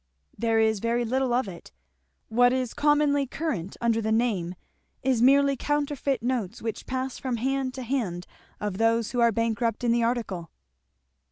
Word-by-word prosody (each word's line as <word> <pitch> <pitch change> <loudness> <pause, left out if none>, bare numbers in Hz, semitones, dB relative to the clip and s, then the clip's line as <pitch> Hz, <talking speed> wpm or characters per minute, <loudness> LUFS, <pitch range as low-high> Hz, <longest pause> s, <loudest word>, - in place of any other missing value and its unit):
"There 225 -1 +1
is 220 -1 +2
very 235 +2 0
little 260 +2 0
of 245 -2 +1
it. 175 -3 -10 0.6
What 245 +2 +4
is 255 -2 -1
commonly 290 -1 +2
current 245 - -3
under 230 -1 +1
the 220 0 -1
name 210 -7 0 0.5
is 255 -3 +2
merely 275 +2 +5
counterfeit 285 -3 -1
notes 235 -5 -2
which 225 -1 -5
pass 260 0 -3
from 255 -3 -2
hand 265 +1 -1
to 260 - -5
hand 220 -9 -2 0.3
of 205 -2 -3
those 225 0 +2
who 245 - -2
are 235 -1 +5
bankrupt 230 0 -1
in 240 - +3
the 235 0 +2
article." 225 -8 -2
235 Hz, 165 wpm, -26 LUFS, 225-265 Hz, 0.6 s, merely